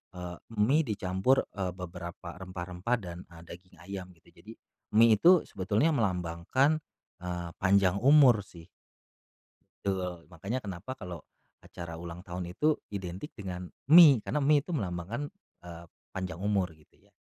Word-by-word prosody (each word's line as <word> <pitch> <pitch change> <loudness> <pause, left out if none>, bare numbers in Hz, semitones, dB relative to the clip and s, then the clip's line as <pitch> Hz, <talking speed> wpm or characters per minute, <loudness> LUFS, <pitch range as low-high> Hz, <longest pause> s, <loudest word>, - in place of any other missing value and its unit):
eee, 90 -1 -6 0.2
mie 135 +10 +4
dicampur, 100 +3 +1
eee, 95 -2 -2
beberapa 85 -1 -8
rempah-rempah 90 +4 -3
dan, 85 -3 -8
eee, 85 - -12
daging 90 +2 -12
ayam 95 0 -6
gitu. 80 - -24
Jadi, - - -13 0.4
mie 115 0 +7
itu 175 - +7 0.2
sebetulnya 105 - +1
melambangkan, 95 - +1 0.5
eee, 90 -1 -4
panjang 95 -1 +3
umur 135 -7 +6
sih. 85 -3 -14 1.2
Betul. 90 -3 -3
Makanya 95 +9 -4
kenapa 100 +1 -7
kalau 90 -4 -7 0.4
acara 85 -1 -8
ulang 85 0 -7
tahun 90 -1 -6
itu 150 +11 +2 0.2
identik 95 - -6
dengan 90 -4 -6 0.3
mie, 150 -8 +10
karena 150 - -1
mie 145 +1 +5
itu 180 - -8
melambangkan, 100 - -4 0.3
eee, 85 -1 -10 0.3
panjang 90 -3 -5
umur 100 -4 +1
gitu 75 -1 -26
ya. - - -28
95 Hz, 140 wpm, -30 LUFS, 85-110 Hz, 1.2 s, mie